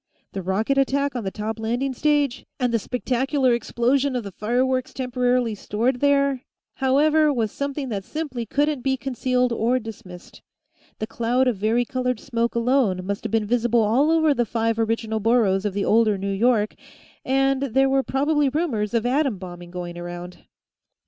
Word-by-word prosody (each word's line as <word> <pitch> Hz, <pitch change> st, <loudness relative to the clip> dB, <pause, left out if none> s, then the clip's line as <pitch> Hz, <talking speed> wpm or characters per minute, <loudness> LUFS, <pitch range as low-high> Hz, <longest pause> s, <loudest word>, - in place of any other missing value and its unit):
The 195 Hz, -, -4 dB
rocket 215 Hz, +9 st, 0 dB
attack 280 Hz, 0 st, +1 dB
on 235 Hz, -4 st, -3 dB
the -, -, 0 dB
top 215 Hz, +2 st, -5 dB
landing 245 Hz, +5 st, -1 dB
stage 290 Hz, -1 st, +1 dB, 0.2 s
and 250 Hz, -2 st, 0 dB
the 230 Hz, -, +3 dB
spectacular 255 Hz, +3 st, 0 dB
explosion 255 Hz, +4 st, 0 dB
of 245 Hz, -, -2 dB
the 200 Hz, -, -7 dB
fireworks 255 Hz, +5 st, -1 dB
temporarily 250 Hz, -2 st, 0 dB
stored 230 Hz, +5 st, -1 dB
there, 280 Hz, -2 st, +2 dB, 0.4 s
however, 300 Hz, +3 st, +3 dB
was 225 Hz, -6 st, -1 dB
something 280 Hz, -1 st, -4 dB
that 200 Hz, -4 st, -3 dB
simply 265 Hz, -4 st, -5 dB
couldn't 290 Hz, +2 st, 0 dB
be 265 Hz, +1 st, 0 dB
concealed 250 Hz, -1 st, 0 dB
or 235 Hz, +3 st, +1 dB
dismissed. 195 Hz, -6 st, -10 dB, 0.6 s
The 215 Hz, -, -3 dB
cloud 240 Hz, +3 st, 0 dB
of 240 Hz, -5 st, +1 dB
varicolored 245 Hz, +3 st, 0 dB
smoke 235 Hz, -2 st, -2 dB
alone 235 Hz, -6 st, +1 dB
must 200 Hz, +3 st, -4 dB
have 225 Hz, -, -3 dB
been 225 Hz, -1 st, +1 dB
visible 235 Hz, +1 st, +2 dB
all 250 Hz, +8 st, +3 dB
over 320 Hz, -2 st, +4 dB
the 245 Hz, -, +1 dB
five 230 Hz, 0 st, -1 dB
original 225 Hz, -1 st, -1 dB
boroughs 215 Hz, -3 st, +2 dB
of 200 Hz, -2 st, -2 dB
the 200 Hz, -, 0 dB
older 215 Hz, -2 st, +3 dB
New 195 Hz, +1 st, -2 dB
York, 215 Hz, 0 st, +2 dB, 0.5 s
and 270 Hz, 0 st, +1 dB
there 270 Hz, 0 st, +2 dB
were 270 Hz, 0 st, +2 dB
probably 285 Hz, +2 st, +1 dB
rumors 245 Hz, -8 st, -1 dB
of 230 Hz, 0 st, +1 dB
atom 265 Hz, -3 st, +1 dB
bombing 175 Hz, -1 st, -9 dB
going 175 Hz, -1 st, -6 dB
around. 175 Hz, +1 st, -8 dB
245 Hz, 170 wpm, -23 LUFS, 215-270 Hz, 0.6 s, over